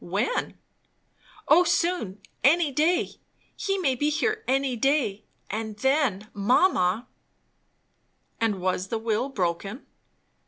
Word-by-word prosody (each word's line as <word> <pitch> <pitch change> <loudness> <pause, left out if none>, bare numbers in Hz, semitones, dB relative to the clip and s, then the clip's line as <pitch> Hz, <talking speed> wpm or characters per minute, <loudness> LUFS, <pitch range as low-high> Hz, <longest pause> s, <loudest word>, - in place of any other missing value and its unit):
"When?" 200 +8 -2 0.9
"O 355 - +6
soon; 335 - 0 0.2
any 310 +2 +4
day. 320 +6 +2 0.5
He 390 0 -1
may 300 -9 +1
be 290 +4 0
here 435 +8 -1
any 270 -1 +1
day. 250 -5 0 0.3
And 215 0 -4
then, 260 -5 +1
mamma 215 - +2 0.7
" - - -44
"And 215 -4 +1
was 185 +1 -1
the 225 - -2
will 225 +3 -1
broken?" 195 - -3
250 Hz, 115 wpm, -26 LUFS, 205-300 Hz, 0.9 s, O